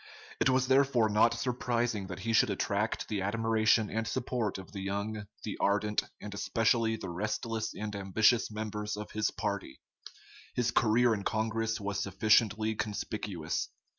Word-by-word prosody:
It - - +3
was 130 0 +3
therefore 130 -4 +4
not 105 +2 +4
surprising 120 -4 -1
that 95 0 -7
he 115 +3 -1
should 110 - +5
attract 100 +2 -1
the 105 -3 -2
admiration 110 +1 +2
and 115 0 -1
support 120 -5 -2
of 95 0 -10
the 100 - -6
young, 100 +2 -3 0.2
the 105 - -5
ardent, 105 +1 +2 0.2
and 105 - -7
especially 115 +2 +1
the 95 -5 -6
restless 110 +4 -2
and 105 -1 -4
ambitious 105 +4 +3
members 105 -1 -4
of 105 - -7
his 110 0 0
party. 100 -10 -4 0.8
His 120 -1 +1
career 120 +1 +4
in 100 -2 -3
Congress 110 +1 -1
was 100 -1 -3
sufficiently 110 +2 +2
conspicuous. 105 -5 -3
110 Hz, 150 wpm, -31 LUFS, 100-115 Hz, 0.8 s, should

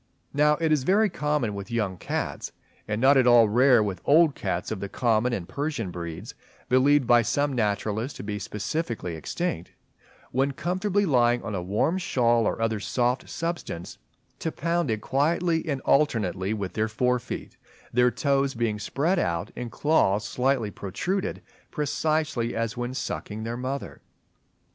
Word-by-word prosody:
Now 150 +1 +4
it 160 -1 +1
is 150 -3 +3
very 200 +8 +3
common 150 -9 -1
with 100 +2 -6
young 105 -5 -1
cats, - - -4 0.3
and 105 0 -2
not 135 +3 +5
at 130 -2 +4
all 120 -2 +7
rare 120 +1 +5
with 95 -4 -4
old 155 0 +5
cats 95 -5 -3
of 110 - -3
the 100 - -5
common 115 +2 +1
and 95 -8 -3
Persian 140 - -3
breeds 85 -2 -6 0.4
(believed 135 +2 +4
by 120 0 +5
some 145 +5 0
naturalists 110 +2 -1
to - - -7
be 105 0 -4
specifically 105 - -3
extinct), 85 - -4 0.6
when 135 +2 +1
comfortably 185 +6 0
lying 120 -6 +3
on 115 - -4
a 95 - -2
warm 105 - 0
shawl 120 - +2
or - - -2
other 115 -1 0
soft 125 +4 -1
substance, 165 - -5 0.4
to 160 - -2
pound 170 -2 -1
it 110 -1 -1
quietly 160 +6 +1
and 140 -3 -2
alternately 105 -9 +1
with 100 -4 -3
their 110 0 0
fore 125 +3 +1
feet; - - -7 0.4
their 125 +1 +4
toes 135 +3 0
being 115 -3 -1
spread 165 - 0
out 85 +3 -1
and 120 -2 -5
claws 110 -9 +2
slightly 125 -4 0
protruded, 180 - -3 0.3
precisely 150 -4 -1
as 115 -1 -2
when 120 +1 -4
sucking 110 -4 -4
their 115 +1 -3
mother. 130 +3 -5
120 Hz, 160 wpm, -26 LUFS, 105-145 Hz, 0.6 s, all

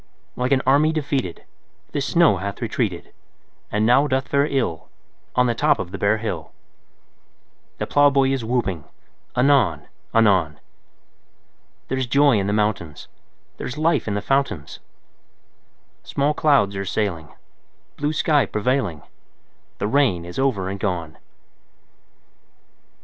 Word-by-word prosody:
Like 125 +1 -2
an 135 -1 +3
army 145 +4 +4
defeated 140 - -3 0.5
The 145 - -2
snow 165 - +3
hath 100 +3 -5
retreated, - - -3 0.6
And 105 +1 +1
now 130 +5 +4
doth 130 -1 -1
fare 140 +1 +2
ill 120 - -2 0.5
On 125 - +4
the 120 - +1
top 115 - +2
of 90 - -5
the 100 - -6
bare 100 +2 +2
hill; 90 -8 -5 1.2
The - - -2
plowboy 140 -2 +3
is 135 -3 -1
whooping 110 -9 -2 0.5
anon 125 - +2 0.2
anon: 95 -9 +3 1.3
There's 130 -1 -2
joy 140 -2 +4
in 95 - -1
the - - 0
mountains; 105 -8 -2 0.5
There's 125 - -6
life 155 -4 +1
in 105 - -1
the 105 - -3
fountains; 135 - -1 1.2
Small 140 +2 0
clouds 140 -11 +2
are 100 - -3
sailing, 90 -6 -3 0.6
Blue 145 +1 -1
sky 150 -5 +2
prevailing; 105 - -1 0.7
The - - -2
rain 110 -9 +2
is 90 +6 -7
over 120 -9 0
and 100 +1 -4
gone! 85 -6 -3
115 Hz, 130 wpm, -22 LUFS, 95-140 Hz, 1.3 s, army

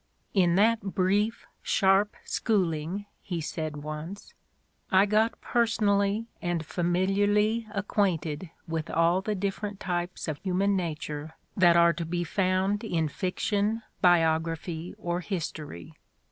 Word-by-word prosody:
"In 175 -4 +4
that 220 +3 +4
brief, 200 +3 0 0.2
sharp 195 +1 +3
schooling," 185 -2 0 0.2
he 175 -3 -4
said 155 -1 -4
once, 155 +6 -7 0.6
"I 190 +1 +6
got 215 +2 +2
personally 210 -2 +1 0.2
and 175 -2 -1
familiarly 205 +6 +1
acquainted 185 -6 -1 0.2
with 160 -1 -3
all 170 +3 +3
the 210 +2 -2
different 200 +1 -3
types 175 -1 -3
of 155 -2 -3
human 195 +1 +1
nature 155 -3 -4 0.2
that 175 -2 +5
are 170 0 +6
to 170 +1 -4
be 175 +1 -2
found 190 +3 0
in 165 -8 0
fiction, 205 +8 -1 0.2
biography 165 0 +1
or 175 0 -2
history. 155 - -5
185 Hz, 120 wpm, -28 LUFS, 165-205 Hz, 0.6 s, I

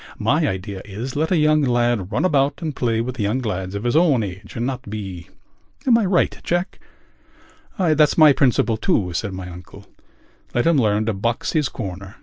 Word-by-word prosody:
My - - +1
idea 95 +1 -4
is: 110 +6 -6
let 160 +3 0
a 180 - +3
young 155 0 +3
lad 120 -6 +1
run - - 0
about 140 -2 +1
and 155 -4 -3
play 115 -2 0
with 125 +1 -5
young 105 +4 0
lads 95 -4 -4
of 100 - -4
his 120 +3 0
own 155 -8 +4
age 100 +1 -8
and 120 - -2
not 130 -4 -4
be.... 95 -5 -7 0.6
Am 250 -3 +5
I 230 -3 +3
right, 180 -1 +1
Jack?" 175 +2 -2 1.0
"That's 155 -5 +3
my 155 -3 +8
principle, 125 -4 +2
too," 90 -4 0
said 100 +4 -2
my 95 -1 -6
uncle. 90 0 -12 0.7
"Let 120 - +2
him 165 -3 +4
learn 105 -2 +1
to 110 - 0
box 115 +5 -2
his 150 -4 +1
corner. 100 -1 -7
120 Hz, 190 wpm, -21 LUFS, 100-150 Hz, 1.0 s, my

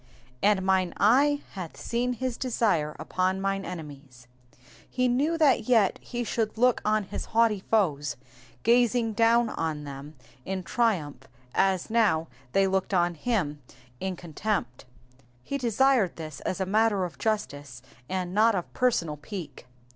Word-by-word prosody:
^''And 200 -2 +3
mine 190 -1 +1
eytt 285 +7 +4
hath 180 -4 -7
seen 245 +1 -1
his 255 0 -3
desire 215 - 0
upon 185 +1 -1
mine 195 0 -1
enemies.'*'' 145 -8 -9 0.6
He 255 0 +1
knew 285 +7 +1
that 275 -8 +3
yet 225 -6 +3
he 240 -1 -4
should 220 -1 -2
look 250 +1 +3
on 215 0 +2
his 200 - -6
haughty 225 -3 +4
foes, 150 - +1 0.5
gazing 235 -1 +3
down 230 +1 +3
on 155 -5 -3
them 140 +2 -9 0.3
in 190 -1 -4
triumph 185 -9 -1 0.3
as 190 0 +1
now 200 -9 +2 0.3
they 195 - +4
looked 190 0 0
on 175 -1 +2
him 165 -6 -2 0.4
in 190 -1 -3
contempt. 170 - -3 0.6
He 280 - -3
desired 240 -4 +2
this 155 -3 -7
as 185 - -3
a 190 - 0
matter 205 -1 +2
of 175 - -9
justice, 145 - -3 0.3
and 185 -1 -2
not 220 +2 +4
of 180 - -4
personal 170 -12 +1
pique. 155 - -8
195 Hz, 145 wpm, -27 LUFS, 170-230 Hz, 0.6 s, eytt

